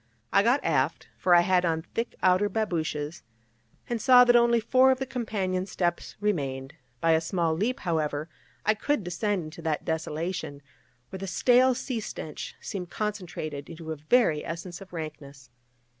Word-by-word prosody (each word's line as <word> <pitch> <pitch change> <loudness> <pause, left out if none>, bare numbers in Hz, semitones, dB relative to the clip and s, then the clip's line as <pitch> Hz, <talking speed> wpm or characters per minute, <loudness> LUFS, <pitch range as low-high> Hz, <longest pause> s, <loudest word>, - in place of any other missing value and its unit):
I 200 - +6
got 240 +7 +2
aft 150 0 0
(for 180 -1 +4
I 175 - +7
had 180 0 +3
on 160 -2 0
thick 230 - -2
outer 185 +2 +4
babooshes), 165 -7 -2 0.7
and 235 -2 -2
saw 250 +1 +8
that 245 -1 +5
only 235 0 +5
four 255 +4 +4
of 260 - +3
the 265 - -3
companion 195 -7 -2
steps 175 -2 -2
remained; 140 -9 -2 0.3
by 165 - +3
a 160 0 +4
small 165 -1 0
leap, 225 +11 -1
however, 155 -3 -1 0.4
I 215 - +5
could 220 +2 -1
descend 180 +2 -1
into 155 +2 -9
that 160 -2 -2
desolation, 160 -2 -3 0.5
where 190 - -6
the 195 - -5
stale 250 +7 +4
sea 250 -1 -3
stench 155 -7 -7
seemed 180 -3 -6
concentrated 175 -9 -4
into 165 -1 -7
a - - -2
very 155 - +2
essence 170 +2 -6
of 195 - -12
rankness. 145 -6 -8
180 Hz, 165 wpm, -27 LUFS, 160-215 Hz, 0.7 s, saw